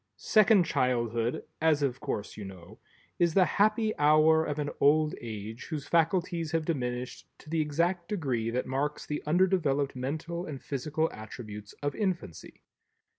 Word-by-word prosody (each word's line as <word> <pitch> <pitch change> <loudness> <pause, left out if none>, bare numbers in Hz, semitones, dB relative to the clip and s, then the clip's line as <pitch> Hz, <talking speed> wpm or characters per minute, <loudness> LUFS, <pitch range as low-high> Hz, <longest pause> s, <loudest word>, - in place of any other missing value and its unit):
Second 215 -4 +5
Childhood, 120 -5 0 0.2
as 155 -2 +3
of 130 -2 -1
course 135 -8 -4
you 105 - -7
know, 95 +1 -11 0.4
is 170 -2 +2
the 190 -2 +6
"happy 215 +5 +2
hour" 155 +2 +5
of 150 -2 -3
an 145 -1 -2
old 155 +2 +4
age 110 0 -7
whose 155 -3 -4
faculties 170 0 +1
have 165 -1 +1
diminished 125 -5 -3
to 155 - -14
the 165 -1 +2
exact 170 +4 0
degree 130 - -1
that 125 +2 -1
marks 140 +3 -2
the 150 - -3
undeveloped 155 -6 +2
mental 160 +7 -3
and 140 -3 -6
physical 155 +4 -1
attributes 105 -1 -9
of 145 - 0
infancy. 180 - -4
150 Hz, 150 wpm, -29 LUFS, 125-170 Hz, 0.4 s, the